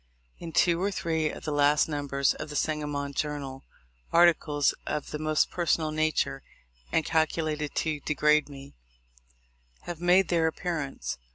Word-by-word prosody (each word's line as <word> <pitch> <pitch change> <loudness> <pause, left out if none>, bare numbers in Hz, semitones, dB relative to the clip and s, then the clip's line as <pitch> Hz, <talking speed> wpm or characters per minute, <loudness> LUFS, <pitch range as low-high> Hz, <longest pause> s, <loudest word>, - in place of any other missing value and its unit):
In 170 - -7
two 170 +1 +3
or 200 - +1
three 160 -5 -1
of - - -8
the 150 - -2
last 145 0 +3
numbers 140 -3 0
of - - -7
the 150 - -7
Sangamon 145 -2 -2
Journal, 140 -2 -4 0.5
articles 165 -4 +4
of 150 - -3
the 150 - -4
most 155 0 +1
personal 165 -3 0
nature, 155 -3 0 0.5
and 160 - +1
calcu 160 0 +1
lated 150 -2 -3
to 155 -2 -1
degrade 150 +1 +2
me, 140 -1 -11 1.1
have 175 -1 -7
made 180 +2 +4
their 165 -2 +2
appearance. 160 - -4
155 Hz, 150 wpm, -28 LUFS, 145-165 Hz, 1.1 s, articles